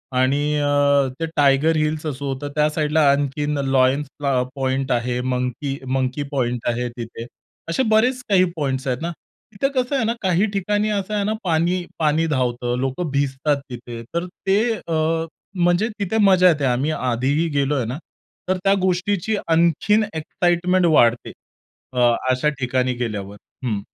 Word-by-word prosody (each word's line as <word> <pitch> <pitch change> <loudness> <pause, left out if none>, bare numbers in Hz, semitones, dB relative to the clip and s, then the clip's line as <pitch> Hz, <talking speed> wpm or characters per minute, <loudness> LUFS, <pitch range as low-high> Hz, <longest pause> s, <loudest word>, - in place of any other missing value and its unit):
आणि 130 +2 +2 0.2
अ, 145 -1 +3
ते 165 - 0
tiger 145 +3 +3
hills 155 0 -1
असं 145 -2 -4
होतं, 140 +1 -3
त्या 150 0 +3
साइडला 155 0 +1
आणखीन 145 +1 -1
लायन्स 135 +2 +3
प्लॉ 135 -3 +1
पॉइंट 135 0 -1
आहे, 120 0 0
मंकी 125 +3 -2 0.2
मंकी 130 +2 -1
पॉइंट 125 -4 -1
आहे 120 +1 -1
तिथे. 115 0 -7 0.4
असे 260 +10 +1
बरेचं 245 +4 +3
काही 190 -3 +5
पॉइंट्स 135 -3 -2
आहेत 125 +1 -1
ना. 170 +1 -2 0.4
तिथे 240 +7 0
कसं 250 +3 -1
आहे 255 -4 +1
ना, 230 - +1
काही 185 +1 +2
ठिकाणी 205 +2 0
असं 205 0 -2
आहे 205 -1 0
ना 215 +2 0
पाणी 175 +1 +1
पाणी 155 +1 +2
धावतं, 125 -4 -1
लोकं 135 +5 -2
भिजतात 140 +1 0
तिथे. 120 -1 -8
तर 170 +1 -1 0.2
ते 195 - +4 0.3
अ, 160 0 0 0.4
म्हणजे 175 +6 +2
तिथे 200 +2 -1
मजा 185 -2 +6
येते. 145 -4 +1
आम्ही 130 +4 +1
आधी 130 0 0
ही 170 - +1
गेलो 140 +1 +1
आहे 125 -5 0
ना. 125 +5 -4 0.5
तर 185 - +2
त्या 195 0 +4
गोष्टीची 190 +3 0
आणखीन 170 +6 +3
एक्साईटमेंट 175 +3 +1
वाढते. 120 -7 +3 0.6
अ, 125 - -2 0.3
अशा 130 +4 +2
ठिकाणी 130 0 0
गेल्यावर. 105 -5 -4 0.3
हं. 110 -4 -1
145 Hz, 160 wpm, -21 LUFS, 130-175 Hz, 0.6 s, मजा